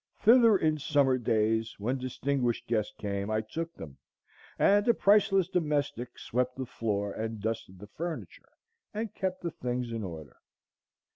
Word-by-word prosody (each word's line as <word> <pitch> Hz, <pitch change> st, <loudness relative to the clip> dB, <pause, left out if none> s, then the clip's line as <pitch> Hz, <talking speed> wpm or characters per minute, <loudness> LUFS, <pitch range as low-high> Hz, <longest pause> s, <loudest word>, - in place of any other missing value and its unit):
Thither 230 Hz, -2 st, +6 dB
in 155 Hz, -3 st, +1 dB
summer 135 Hz, -2 st, +2 dB
days, 110 Hz, -1 st, +1 dB
when 125 Hz, +6 st, -1 dB
distinguished 130 Hz, -1 st, -1 dB
guests 110 Hz, -2 st, 0 dB
came, 100 Hz, 0 st, -3 dB
I 110 Hz, 0 st, +1 dB
took 165 Hz, +10 st, -5 dB
them, 70 Hz, -4 st, -10 dB, 0.6 s
and 205 Hz, +2 st, +4 dB
a 235 Hz, -, +5 dB
priceless 195 Hz, -3 st, +4 dB
domestic 145 Hz, -8 st, -1 dB
swept 125 Hz, +1 st, -1 dB
the 130 Hz, -, -4 dB
floor 105 Hz, -4 st, -2 dB
and 110 Hz, 0 st, -4 dB
dusted 110 Hz, -3 st, -4 dB
the 100 Hz, -, -10 dB
furniture 165 Hz, +10 st, -7 dB, 0.5 s
and 220 Hz, -1 st, -3 dB
kept 185 Hz, -1 st, -3 dB
the 170 Hz, -, -2 dB
things 125 Hz, -3 st, -3 dB
in 115 Hz, -2 st, -3 dB
order. 80 Hz, -6 st, -8 dB
125 Hz, 150 wpm, -29 LUFS, 110-165 Hz, 0.6 s, Thither